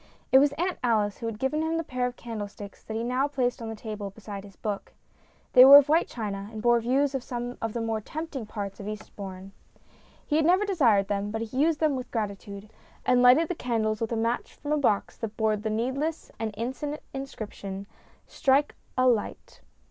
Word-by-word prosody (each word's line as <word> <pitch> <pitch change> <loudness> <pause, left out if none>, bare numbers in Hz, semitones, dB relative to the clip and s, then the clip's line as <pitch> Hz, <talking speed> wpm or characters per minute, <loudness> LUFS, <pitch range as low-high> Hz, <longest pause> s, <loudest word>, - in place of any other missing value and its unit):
It 265 - +8
was 285 +1 +4
Aunt 355 +4 -2
Alice 215 -4 +1
who 230 - -4
had 225 -2 -4
given 265 +6 0
him 320 +1 0
the 330 - -1
pair 250 -4 -1
of 250 - -6
candle 225 -4 -5
sticks 200 0 -11
that 220 - -6
he 225 - -1
now 255 +3 +1
placed 255 -4 -1
on 225 - -5
the 225 - -5
table 210 -2 -6
beside 200 -1 -8
his 200 -2 -14
book. 205 0 -5 0.6
They 250 - +10
were 275 +2 +12
of 290 0 +5
white 325 +3 +4
china, 205 -3 -5
and 220 - -7
bore 240 +1 +4
views 265 +4 +1
of 270 - -1
some 245 0 -5
of 225 -1 -2
the 235 - -2
more 225 -1 -1
tempting 295 -2 -6
parts 200 -2 -5
of 200 - -7
Eastbourne. 195 -2 -8 0.7
He 300 - +1
had 315 - +3
never 370 +5 +4
desired 240 - +3
them, 205 0 -1
but 225 +2 -3
he 230 +3 -7
used 315 +1 +3
them 310 -3 +2
with 255 -1 -5
gratitude, 200 -2 -4 0.4
and 250 -1 +4
lighted 255 +7 +6
the 360 - -1
candles 225 -7 -1
with 225 - -2
a - - 0
match 230 +2 -1
from 290 - -6
a 300 - +3
box 215 -8 +1
that 225 -2 -6
bore 220 -1 +2
the 215 +1 -3
needless 265 +9 -2
and 225 -1 -2
insensate 265 +7 -4
inscription: 205 -7 -6 0.2
" - - -31
Strike 280 0 +2 0.2
a 255 0 +4
light." 230 -4 -1
235 Hz, 215 wpm, -27 LUFS, 210-275 Hz, 0.7 s, were